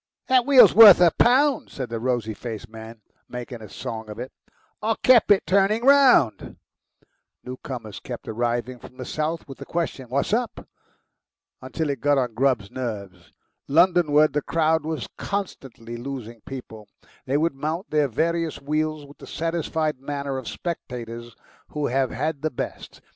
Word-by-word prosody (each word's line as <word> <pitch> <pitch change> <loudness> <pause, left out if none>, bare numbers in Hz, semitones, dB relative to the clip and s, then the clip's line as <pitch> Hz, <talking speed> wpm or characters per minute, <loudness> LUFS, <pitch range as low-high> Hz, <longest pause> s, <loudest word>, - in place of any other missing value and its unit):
"That 255 -1 +4
wheel's 275 -3 +8
worth 215 -4 +10
a 175 -2 +6
pound," 270 - +3
said 130 -4 -6
the 115 -1 -4
rosy 120 -2 -1
faced 115 0 -7
man, 110 0 -11 0.3
making 125 -1 -7
a 105 - -10
song 110 +2 -7
of 105 - -8
it. 125 +2 -7 0.5
"I 220 +1 0
kep' 250 -5 +5 0.2
turning 200 +4 +2
it - - -2
round." 270 - +4 0.9
Newcomers 125 -4 -7
kept - - -8
arriving 120 +2 -2
from 130 - -14
the 130 - -6
south 155 +2 -3
with 135 - -11
the - - -8
question, 160 -7 -4
"What's 140 - -1
up?" 235 +1 -2 0.9
until 160 -3 -3
it 135 -4 -6
got 145 -1 +3
on 125 -3 -1
Grubb's 125 -5 0
nerves. 100 -8 -6 0.4
Londonward 155 -2 +4
the 150 - 0
crowd 160 0 +1
was 160 -5 -4
constantly 130 - -5
losing 120 -3 -7
people; 115 -5 -9 0.4
they 135 +2 +1
would 165 +1 +1
mount 155 +7 -4
their 150 -1 +2
various 165 +5 -1
wheels 155 +1 -2
with 140 +1 -17
the - - -12
satisfied 160 -3 -2
manner 140 -1 -4
of 125 - -10
spectators 120 -8 -6 0.3
who 150 -1 -3
have 130 0 0
had 145 +2 -3
the 155 - 0
best. 125 - -7
140 Hz, 160 wpm, -23 LUFS, 120-165 Hz, 0.9 s, worth